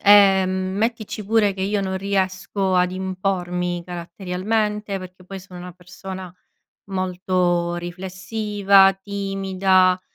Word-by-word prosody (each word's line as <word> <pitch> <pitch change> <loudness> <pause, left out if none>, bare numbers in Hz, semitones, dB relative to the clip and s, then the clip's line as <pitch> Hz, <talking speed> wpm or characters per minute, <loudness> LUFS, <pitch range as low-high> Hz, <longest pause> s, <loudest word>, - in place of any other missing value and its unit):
Ehm, 190 -2 +5
mettici 220 -1 -2
pure 210 -1 +3
che 190 - -4
io 205 +1 0
non 190 -1 -2
riesco 195 0 0
ad 180 0 +2
impormi 180 -2 -2
caratterialmente 195 +4 -2
perché 185 0 -11
poi 195 0 -8
sono 180 -1 -12
una 180 0 -8
persona 180 +1 -9 0.6
molto 180 -2 0
riflessiva, 195 +2 +2
timida, 195 -2 +2
190 Hz, 105 wpm, -22 LUFS, 180-200 Hz, 0.6 s, Ehm